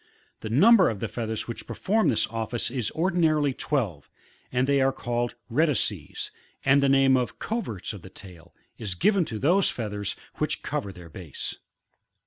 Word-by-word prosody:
The 110 Hz, -, -6 dB
number 190 Hz, -, +6 dB
of 110 Hz, -4 st, -4 dB
the 115 Hz, -, -2 dB
feathers 110 Hz, 0 st, -4 dB
which 115 Hz, -, -6 dB
perform 215 Hz, -4 st, +1 dB
this 115 Hz, -, +2 dB
office 115 Hz, +1 st, -3 dB
is 125 Hz, -4 st, -1 dB
ordinarily 160 Hz, -5 st, +2 dB
twelve, 110 Hz, -, -2 dB, 0.4 s
and 125 Hz, 0 st, +2 dB
they 140 Hz, 0 st, +3 dB
are 135 Hz, 0 st, +4 dB
caHed 120 Hz, -2 st, -2 dB
rectrices, 150 Hz, +3 st, 0 dB, 0.3 s
and 140 Hz, +1 st, +5 dB
the 140 Hz, -, +3 dB
name 135 Hz, -1 st, +5 dB
of 125 Hz, -1 st, -1 dB
cooerts 115 Hz, -, -3 dB
of 100 Hz, -, -9 dB
the 95 Hz, -, -11 dB
tail, 90 Hz, -3 st, -13 dB, 0.3 s
is 100 Hz, -5 st, -3 dB
given 195 Hz, -, +3 dB
to 110 Hz, -, -5 dB
those 175 Hz, -, +3 dB
feathers 105 Hz, -3 st, -3 dB, 0.2 s
which -, -, -1 dB
cover 100 Hz, -, -3 dB
thdr 85 Hz, -4 st, -13 dB
base. 85 Hz, -7 st, -6 dB
120 Hz, 165 wpm, -26 LUFS, 105-145 Hz, 0.4 s, number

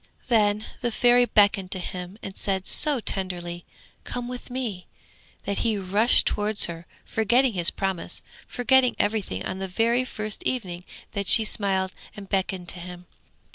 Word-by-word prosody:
Then 210 Hz, -2 st, +3 dB, 0.2 s
the 240 Hz, -, +1 dB
Fairy 245 Hz, +2 st, +5 dB
beckoned 200 Hz, -4 st, +3 dB
to -, -, -2 dB
him 180 Hz, +2 st, -6 dB
and 195 Hz, -, -7 dB
said 190 Hz, -1 st, -1 dB
so 295 Hz, -4 st, +1 dB
tenderly, 175 Hz, -4 st, -3 dB, 0.4 s
'Come 245 Hz, -1 st, -5 dB
with 250 Hz, +1 st, -7 dB
me,' 240 Hz, -8 st, -4 dB, 0.6 s
that 200 Hz, -, -1 dB
he 225 Hz, -3 st, +1 dB
rushed 200 Hz, +5 st, +4 dB
towards 210 Hz, 0 st, +1 dB
her, 170 Hz, 0 st, -7 dB, 0.2 s
forgetting 240 Hz, +3 st, +2 dB
his 175 Hz, -2 st, +3 dB
promise, 190 Hz, -3 st, -3 dB, 0.2 s
forgetting 250 Hz, 0 st, +3 dB
everything 205 Hz, -, -1 dB
on 190 Hz, -, -4 dB
the 190 Hz, -, -3 dB
very 230 Hz, +6 st, +2 dB
first 215 Hz, -4 st, -4 dB
evening 180 Hz, -8 st, -3 dB, 0.3 s
that 200 Hz, -2 st, -3 dB
she 220 Hz, -, +6 dB
smiled 190 Hz, -3 st, +1 dB, 0.2 s
and 200 Hz, -1 st, -9 dB
beckoned 190 Hz, -2 st, -1 dB
to 180 Hz, -, -4 dB
him. 180 Hz, 0 st, -9 dB
205 Hz, 155 wpm, -25 LUFS, 185-235 Hz, 0.6 s, she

